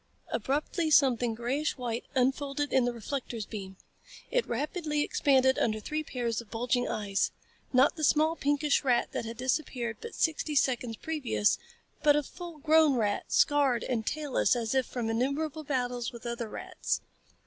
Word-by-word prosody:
Abruptly 300 - -1
something 250 -6 +4
grayish 265 +7 -1
white 240 -2 -3
unfolded 275 +2 0
in 260 -2 +4
the 245 - +1
reflector's 235 -1 -4
beam. 195 -3 -7 0.5
It - - +1
rapidly 300 +4 -1
expanded 265 -3 +3
under 215 -1 +1
three 305 +8 -3
pairs 240 -5 -2
of 230 - -16
bulging 245 +2 0
eyes 200 -2 0 0.4
not 260 +4 +4
the 310 - -4
small, 310 +3 +4
pinkish 290 -1 +1
rat 245 -3 +2
that - - -3
had 230 0 -6
disappeared 255 -3 -1
but 465 - -7
sixty 310 -1 0
seconds 245 -4 +1
previous, 295 -9 0 0.4
but 295 -1 +5
a 295 - +2
full 345 +2 -9
grown 310 -1 +4
rat, 210 -4 0
scarred 280 -5 +3
and 235 -3 -1
tailless 295 -4 +1
as 230 -1 -1
if 265 -1 +2
from 240 -3 -3
innumerable 280 +7 -1
battles 250 -3 -2
with 235 -1 -11
other 235 -1 -3
rats. - - -3
260 Hz, 160 wpm, -29 LUFS, 235-295 Hz, 0.5 s, but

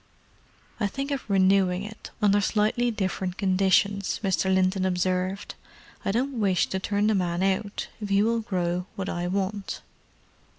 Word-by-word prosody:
"I 210 - +1
think 275 +7 -4
of 270 -5 -3
renewing 190 -1 +3
it, 220 +2 -9
under 205 0 +4
slightly 215 +4 +1
different 190 -3 -2
conditions," 195 +1 +2
Mr. 190 -1 +1
Linton 185 0 +2
observed. 185 +1 -1 0.5
"I - - 0
don't 250 +3 -1
wish 195 -4 +3
to 190 - -1
turn 205 +2 0
the 215 - +3
man 180 -2 0
out, 195 +2 -1
if 205 - -4
he 200 +1 +4
will 230 +1 +2
grow 180 -4 -2
what 195 0 -3
I 175 0 -2
want." 195 +2 -3
195 Hz, 155 wpm, -26 LUFS, 185-210 Hz, 0.5 s, under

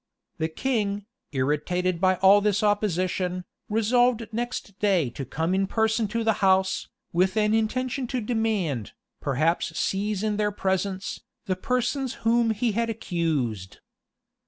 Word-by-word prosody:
[*] - - -53
The 160 - +1
king, 205 +1 -1 0.3
irritated 165 +6 0
by 185 -1 +4
all 200 +2 +7
this 210 0 +1
opposition, 185 -3 0 0.2
resolved 230 +1 +2
next 235 -3 -4
day 185 - +2
to 135 - -6
come 160 +6 -1
in 195 +1 +1
person 220 +1 +1
to 230 +2 -2
the 220 0 +3
house, 190 -1 +3 0.3
with 185 +4 +2
an 210 0 +3
intention 250 +4 0
to 255 +1 -2
demand, 210 - -1 0.3
perhaps 155 +5 0
seize 205 +1 -1
in 210 -1 0
their 210 0 +1
presence, 190 0 -2 0.2
the 185 - 0
persons 250 +4 -1
whom 230 0 +4
he 225 +2 +1
had 230 +2 0
accused. 155 - -2
205 Hz, 140 wpm, -26 LUFS, 180-225 Hz, 0.3 s, all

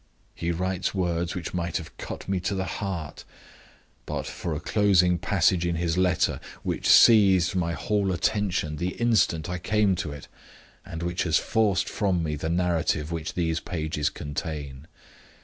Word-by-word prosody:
He 85 - -4
writes 90 +3 -1
words 85 -1 -1
which 90 -2 -5
might 85 -2 -1
have - - -9
cut - - -7
me 95 -1 0
to 95 +3 -2
the 95 0 -2
heart, 90 -4 -5 0.8
but - - -3
for 85 -3 -4
a - - -3
closing 90 -3 +3
passage 95 -3 +2
in 85 -1 0
his 85 0 -1
letter, 90 -1 +1 0.2
which - - -1
seized 95 -5 +6
my 85 -2 0
whole 100 +1 0
attention 90 -4 0
the 90 +4 -2
instant 110 -9 +2
I 90 0 -3
came 105 +1 +2
to 80 -3 -3
it, 70 -1 -9 0.6
and 80 0 -7
which 85 +1 -2
has 80 -3 +2
forced 100 -4 +1
from 95 -5 0
me 75 -1 -2
the 80 +2 -4
narrative 85 -3 0
that 80 -2 -4
these 80 -2 0
pages 75 -3 -2
contain. 75 -1 -6
90 Hz, 165 wpm, -26 LUFS, 80-95 Hz, 0.8 s, seized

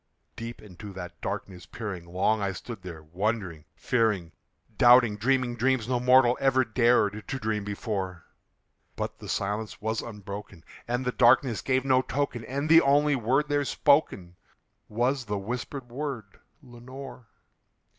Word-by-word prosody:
Deep 115 0 -8
into 105 0 -10
that 90 -2 -9
darkness 95 -2 -5
peering, 95 -7 -6
long 95 +5 +1
I 100 -1 -1
stood 110 +3 -8
there 85 -4 -9
wondering, 90 -1 -3
fearing, 105 -8 0 0.4
Doubting, 120 -3 +6
dreaming 125 +2 +1
dreams 125 -1 +1
no 125 -1 0
mortal 125 0 +5
ever 130 -1 +3
dared 110 -3 +2
to 135 - -3
dream 110 -3 -2
before; 100 -4 -4 0.7
But - - -5
the - - -9
silence 105 +2 -3
was 110 +1 -2
unbroken, 100 -5 -9 0.2
and 125 +2 -2
the 125 - +1
darkness 120 -1 +4
gave 130 0 0
no 130 -1 +4
token, 130 -2 -2
And 140 +3 -3
the 165 +1 +7
only 145 +1 +3
word 130 +5 +1
there 145 0 +1
spoken 140 - +1 0.5
was 125 +5 0
the 105 -2 -2
whispered 120 +5 -5
word, 125 -7 -6 0.2
"Lenore!" 125 0 -11
115 Hz, 145 wpm, -27 LUFS, 100-130 Hz, 0.7 s, the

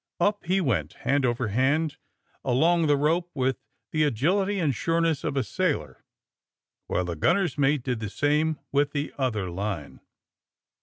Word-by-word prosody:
Up 205 0 +1
he 185 +3 +2
went, 100 - 0
hand 140 -2 +3
over 120 -1 -1
hand 140 +8 +1 0.5
along 165 +6 +3
the 145 -1 +4
rope, 165 +5 +1
with 130 -1 0 0.3
the 155 - 0
agility 180 - +1
and 155 -7 +1
sureness 165 +2 0
of 140 - -2
a 135 - +2
sailor, 135 - -2 0.8
while 90 - 0
the 85 -1 -3
gTinner's 175 - +2
mate 145 -2 +2
did 125 -3 -2
the 105 -2 -4
same 150 +6 +1
with 145 +1 +1
the 145 0 -2
other 110 -9 -1
line. 95 -5 -4
145 Hz, 155 wpm, -26 LUFS, 120-165 Hz, 0.8 s, the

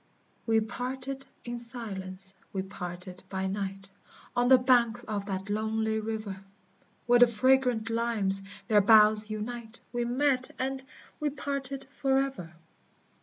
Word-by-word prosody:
We 225 -1 +4
parted 260 +4 -5 0.2
in 240 0 -4
silence, 195 -5 -6 0.2
we 190 -1 -2
parted 180 -1 -8
by 190 0 -2
night, 195 0 -4 0.4
On 245 0 +3
the 260 0 +8
banks 245 -2 +3
of 205 -3 -4
that 190 -1 -3
lonely 220 +1 0
river; 215 -3 -5 0.6
Where 245 0 +5
the 245 - +8
fragrant 250 0 +2
limes 225 -4 +2 0.3
their 210 -2 +5
boughs 215 0 +6
unite, 225 +2 -5
We 240 0 0
met 255 +1 +1
and 265 +1 -2 0.4
we 300 - 0
parted 275 -1 -2
forever! 270 - -1
225 Hz, 125 wpm, -29 LUFS, 200-255 Hz, 0.6 s, the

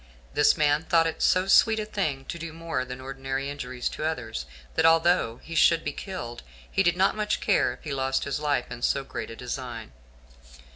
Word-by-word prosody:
This 145 +2 +4
man 150 -1 +3
thought 165 -1 +3
it 165 - -3
so 185 0 +3
sweet 220 +3 +5
a 215 - -2
thing 155 -11 -2
to 170 - -6
do 165 -1 -6
more 165 -5 -3
than 125 0 -7
ordinary 135 +1 -4
injuries 130 -3 -4
to - - -6
others, 115 - -3 0.3
that - - +1
although 165 -7 +4
he 165 - -8
should 165 +1 +4
be - - -3
killed, 180 - -6 0.3
he - - +2
did 175 -2 +2
not 190 +3 +3
much 210 -1 0
care - - +2
if - - -11
he 150 -4 -4
lost 135 0 0
his 140 +1 -2
life 145 -4 -1
in 120 - -7
so 135 +2 +1
great - - -6
a 115 - -8
design. 120 -2 -6
145 Hz, 205 wpm, -26 LUFS, 130-165 Hz, 0.3 s, sweet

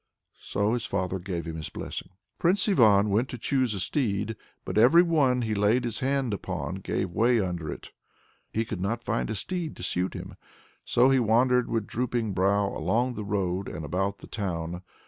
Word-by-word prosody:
So 100 +2 0
his 120 -1 -2
father 95 -2 -1
gave 90 -2 -4
him 80 -1 -5
his 80 - -5
blessing. - - -6 0.3
Prince 185 +5 +2
Ivan 105 - +5
went 115 +6 +1
to 125 - -5
choose 130 -2 0
a - - -4
steed, 110 0 -1 0.3
but - - -4
every 125 +11 +7
one 140 -7 +2
that - - -1
he 110 - -1
laid 105 +5 +2
his 115 -2 -2
hand 135 -3 0
upon 95 -1 -4
gave 95 -1 -2
way 115 +5 +3
under 90 -6 -2
it. - - -9 0.6
He 110 +1 -1
could 90 - -5
not 115 +5 -2
find 115 -2 -1
a 110 - -2
steed 170 - -3
to - - -9
suit 90 +1 0
him, - - -8 0.5
so 125 +3 +4
he 135 - +4
wandered 125 +2 +3
with 115 -2 -1
drooping 120 -3 -2
brow 100 +2 +2
along 115 +10 0
the 110 - -5
road 100 -2 -1
and 80 - -6
about 95 +6 -1
the - - -12
town. 90 -4 -3
110 Hz, 195 wpm, -27 LUFS, 95-125 Hz, 0.6 s, every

